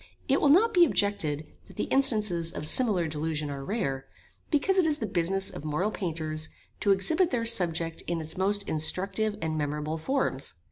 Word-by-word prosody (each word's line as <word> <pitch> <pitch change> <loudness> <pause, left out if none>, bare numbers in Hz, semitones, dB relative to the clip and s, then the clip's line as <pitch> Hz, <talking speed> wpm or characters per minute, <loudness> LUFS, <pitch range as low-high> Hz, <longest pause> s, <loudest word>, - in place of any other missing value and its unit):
It 275 - +2
will 290 - +4
not 430 +10 +5
be 355 -3 +6
objected 165 - 0 0.2
that - - -15
the - - -2
instances 210 -11 +1
of 150 - -6
similar 195 -4 +3
delusion 155 -1 -3
are 140 -1 -6
rare, 135 - -3 0.4
because 375 +5 +2
it 345 - +3
is 300 -2 +2
the 225 - -3
business 190 0 0
of - - -8
moral 155 +8 -1
painters 155 -5 -2 0.3
to 205 - 0
exhibit 320 - +2
their 235 -3 -1
subject 170 -7 +1
in 170 -1 -1
its 160 0 -4
most 200 +2 +1
instructive 195 +7 0
and 160 -1 -2
memorable 150 +2 -3
forms. 155 - -2
185 Hz, 180 wpm, -27 LUFS, 155-230 Hz, 0.4 s, be